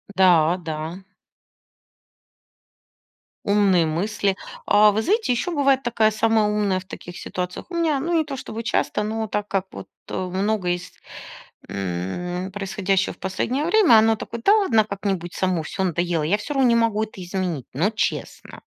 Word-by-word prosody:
Да, 175 -2 +5
да. 160 +1 -5 2.5
Умные 200 -4 +3
мысли. 195 +4 -1 0.3
А 210 +1 +6
вы 215 +2 0
знаете, 420 - +1
ещё 295 +9 -1
бывает 275 -3 +2
такая 225 -2 +2
самая 220 0 +2
умная 205 -3 +1
в 185 - -13
таких 175 -1 -9
ситуациях. 180 0 -5
У 350 - -6
меня, 320 -5 +1
ну, 340 +5 -2
не 315 - +3
то 280 -3 -6
чтобы 225 -2 -6
часто, 215 - 0
но 220 +1 -2
так 210 0 -2
как 195 -2 -1
вот, - - -9 0.2
э, - - -7
много 190 +1 -1
есть, 175 +1 -3 0.7
м, 100 - -4
происходящего 195 -1 -1
в - - -22
последнее 250 +10 -2
время, 355 - +5
оно 225 +1 +4
такое: 235 +2 -7
"Да 405 - +7
ладно, 375 - +4
как-нибудь 195 -4 -3
само. 185 -4 0
Всё 190 +4 -3
надоело, 175 -2 0
я 190 +7 +2
всё 245 +8 -5
равно 265 -3 +3
не 235 - +4
могу 225 -2 +2
это 210 -3 -8
изменить". 175 -7 -3
Ну, 175 - +1
честно! - - -3
200 Hz, 165 wpm, -23 LUFS, 180-225 Hz, 2.5 s, Да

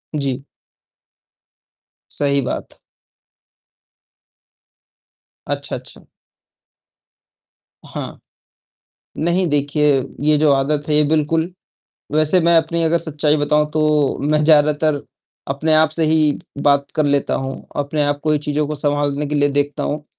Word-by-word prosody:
जी। 135 -2 -2 1.7
सही 140 -1 0
बात। 125 - -5 2.7
अच्छा, - - -3
अच्छा। - - -12 1.8
हाँ। - - -7 1.0
नहीं 175 +3 +1
देखिए, 145 -1 +2 0.2
ये 150 +1 +3
जो 150 -1 +3
आदत 145 +2 0
है 150 - +3
ये 150 - +4
बिल्कुल 160 +3 0 0.6
वैसे 155 +4 +3
मैं 170 0 +4
अपनी 165 +1 -1
अगर 165 +1 +2
सच्चाई 150 -2 0
बताऊँ 150 0 +2
तो 150 -2 +1
मैं 150 0 +2
ज़्यादातर 150 -1 +3 0.5
अपने 155 +3 0
आप 155 0 +4
से 160 +1 -1
ही 155 -2 +2 0.2
बात 140 -1 +3
कर 155 - +1
लेता 140 -1 +1
हूँ। 135 0 -3 0.2
अपने 145 +1 -1
आप 145 0 -1
को 155 - 0
ही 150 - +2
चीज़ों 150 0 -1
को 150 - -4
सँभालने 145 0 -1
के 150 - -4
लिए 145 0 +3
देखता 145 0 -1
हूँ। 150 0 -3
150 Hz, 125 wpm, -19 LUFS, 145-155 Hz, 2.7 s, ये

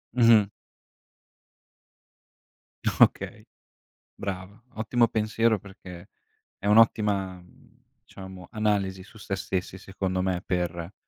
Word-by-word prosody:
Mh-mh. 115 -4 +6 2.5
Okay. - - +3 0.7
Brava, 100 +3 -6
ottimo 115 +2 +2
pensiero 110 0 +1
perché 90 -3 -12 0.5
è - - -6
un'ottima 105 -4 +3 0.6
diciamo 95 -1 -11
analisi 100 -3 0
su 110 +3 -16
sé 100 -1 -4
stessi 95 0 -3
secondo 95 -1 -3
me 95 -1 -1
per, 85 0 -2
100 Hz, 85 wpm, -26 LUFS, 95-110 Hz, 2.5 s, Mh-mh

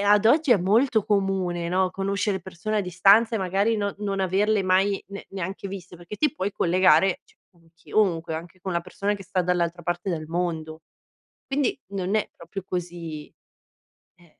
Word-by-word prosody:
ad 205 +1 +4
oggi, 295 +3 +4
è - - +6
molto 220 +5 +3
comune, 190 -4 0
no, 185 +1 +1
conoscere 195 0 -1
persone 190 +4 -4
a - - +3
distanza, 200 +6 +4
e - - +1
magari, 195 +4 +1
no 205 -1 -2
non 200 -2 -2
averle 200 +2 +2
mai 190 +2 +2
ne 200 0 -8
neanche 195 +1 -5
viste, 185 -2 -8
perché 175 +5 -9
ti 300 -2 +2
puoi 200 -9 -2
collegare, 185 +1 +3
cioè, - - -27
con 165 -2 -26
chiunque, 170 -5 0
anche 175 +3 -8
con 190 0 -4
la 170 - 0
persona 200 +3 -2
che 200 - -8
sta 185 -1 0
dall'altra 175 -1 0
parte 175 +3 -3
del 155 -2 -3
mondo. 160 -2 -3 0.7
Quindi, 275 -1 0
non 195 +1 -2
è 215 - 0
proprio 195 -2 -7
così. 170 -4 -6 0.8
Eh. 175 -1 -22
190 Hz, 175 wpm, -25 LUFS, 175-205 Hz, 0.8 s, è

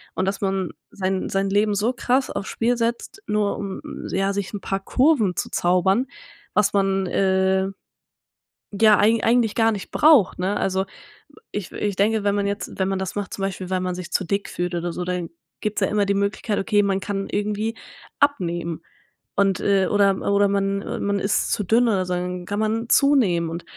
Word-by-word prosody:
und, 185 - 0
dass 195 0 -2
man 190 -3 -1 0.2
sein 190 -1 -2
sein 195 0 0
Leben 205 +1 +2
so 210 +5 +1
krass 255 +2 0
aufs 195 - -4
Spiel 240 +2 0
setzt, 235 +12 -3
nur 210 -1 0
um 195 -1 -5 0.3
ja, 195 +2 +1
sich 200 -1 -3
'n 205 - -5
paar 195 +1 -2
Kurven 250 - +2
zu - - -3
zaubern, 185 +7 +2 0.5
was 210 0 +3
man, 195 -1 +1
äh, 190 0 +2 1.1
ja, 215 -2 +6
eigen 225 +2 +3
eigentlich 230 -2 +3
gar 225 -1 +3
nicht 200 -3 -6
braucht, 295 - +5
ne? 190 +3 0
Also, 190 -1 0 0.7
ich 205 -3 -5
ich 205 -2 -2
denke, 210 +2 +1
wenn 200 -1 +2
man 200 0 0
jetzt 200 +1 -3
wenn 190 - +1
man 195 -1 -1
das 190 -2 -4
macht, 205 -2 -4
zum 195 - -4
Beispiel, 190 -1 -4
weil 185 -1 0
man 180 -1 -2
sich 180 -1 -7
zu - - +1
dick 200 +4 -2
fühlt 175 0 -3
oder 170 0 -2
so, 180 - -4
dann 180 -2 -3 0.3
gibt's 215 0 -1
ja 190 - +3
immer 205 -1 +1
die 200 - +1
Möglichkeit, 200 +1 -1
okay, 205 +1 +2
man 195 -1 +1
kann 195 0 -3
irgendwie 210 +2 -2 0.4
abnehmen. 175 - 0 0.5
Und, 195 -2 +2
äh 195 -1 +3
oder 200 -1 +3 0.2
oder 200 0 +4
man 195 0 0
äh, - - -4
man 200 0 0
ist 200 +1 0
zu 210 - 0
dünn 230 +6 +3
oder 195 -5 +1
so, 180 - -1
dann 180 0 -4
kann 205 +1 -2
man 225 +2 -1
zunehmen. 210 - +3
Und, 170 +1 -5
200 Hz, 200 wpm, -23 LUFS, 190-210 Hz, 1.1 s, ja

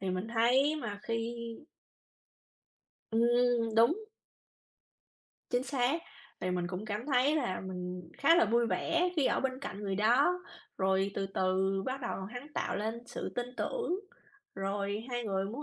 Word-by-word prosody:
thì 190 -1 -1
mình 185 +4 -2
thấy 260 +7 +4
mà 210 -8 -4
khi 230 +1 -2 1.8
Ừm, 235 0 +3
đúng. 290 - +4 1.4
Chính 245 +1 +1
xác, 275 +4 0 0.4
thì 185 - -1
mình 180 -1 0
cũng 185 +3 -4
cảm 215 +4 -3
thấy 275 +2 +3
là 245 -11 -1
mình 180 -2 -5
khá 325 +4 +6
là 345 - +6
vui 235 +2 +3
vẻ 335 +8 +1
khi 280 - +3
ở - - +2
bên 265 0 -1
cạnh 200 -5 -5
người 195 -2 -2
đó, 255 - +4 0.4
rồi 190 +1 +2
từ 195 -1 -1
từ 190 0 +1
bắt 265 +1 -2
đầu 195 - -3
hắn 250 +8 -8
tạo - - -1
lên 225 +3 -3
sự - - -5
tin 245 0 -1
tưởng, 435 -7 -1 0.5
rồi 200 +3 -2
hai 240 -1 -2
người 195 -2 0
muốn, 235 +9 -5
230 Hz, 155 wpm, -32 LUFS, 195-260 Hz, 1.8 s, khá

